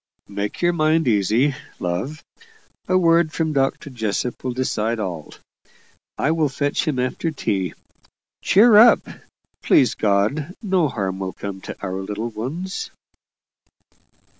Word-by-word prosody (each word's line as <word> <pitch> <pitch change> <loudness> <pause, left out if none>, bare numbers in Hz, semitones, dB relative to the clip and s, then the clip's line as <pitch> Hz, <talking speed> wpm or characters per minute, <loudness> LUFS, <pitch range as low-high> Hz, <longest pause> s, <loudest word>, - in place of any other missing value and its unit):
"Make 100 - -4
your 175 0 +3
mind 160 -2 +2
easy, 115 +6 +2 0.2
love; 95 - -3 0.6
a 185 - +3
word 170 -2 +3
from 160 -1 -1
Dr. 135 0 -1
Jessop 115 0 -3
will 130 - -1
decide 115 -3 -1
all. 85 -7 -5 0.8
I 155 - +1
will 160 -3 +1
fetch 145 +4 -1
him 150 -4 0
after 130 +6 -1
tea. 95 - -2 0.7
Cheer 215 +2 +6
up! 230 +1 +7 0.5
Please 125 -4 +4
God, 110 - 0
no 190 -7 +1
harm 95 -7 -3
will 95 -1 -4
come 100 -1 -7
to - - -8
our 95 0 -3
little 105 +4 -4
ones!" 160 - -5
130 Hz, 130 wpm, -21 LUFS, 100-160 Hz, 0.8 s, up